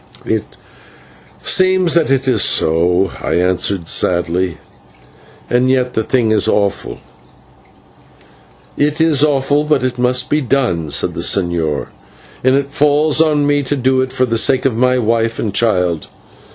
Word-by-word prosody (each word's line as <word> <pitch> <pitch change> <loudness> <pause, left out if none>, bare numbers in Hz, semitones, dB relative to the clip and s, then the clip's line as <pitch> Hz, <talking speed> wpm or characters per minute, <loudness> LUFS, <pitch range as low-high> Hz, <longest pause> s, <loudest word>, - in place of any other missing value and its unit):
"It - - -3 0.9
seems 185 -2 +2
that 165 -4 +2
it 135 0 0
is 120 -5 +2
so," 90 +4 +1
I - - -2
answered 90 0 -1
sadly, 90 -1 0 0.9
"and 125 +1 +1
yet 125 -1 0
the 110 - 0
thing 115 -2 0
is 105 -2 +2
awful." 100 -1 -1 1.8
"It 150 +2 -1
is 160 -3 +2
awful, 145 0 +1
but 150 -4 0
it 125 -1 -3
must 125 0 +1
be 150 +1 +1
done," 120 - -1
said - - -1
the - - -7
señor, 80 -8 -1 0.5
"and 130 +1 +3
it 140 0 -2
falls 150 +2 +2
on 150 -2 +2
me 145 0 +1
to 140 +1 -2
do 130 0 +1
it 130 0 -3
for 130 - 0
the 115 -2 -1
sake 130 +3 +1
of 130 -4 +1
my 125 +2 +2
wife 115 -1 0
and 105 -3 -3
child. 90 -7 0
125 Hz, 150 wpm, -15 LUFS, 95-140 Hz, 1.8 s, and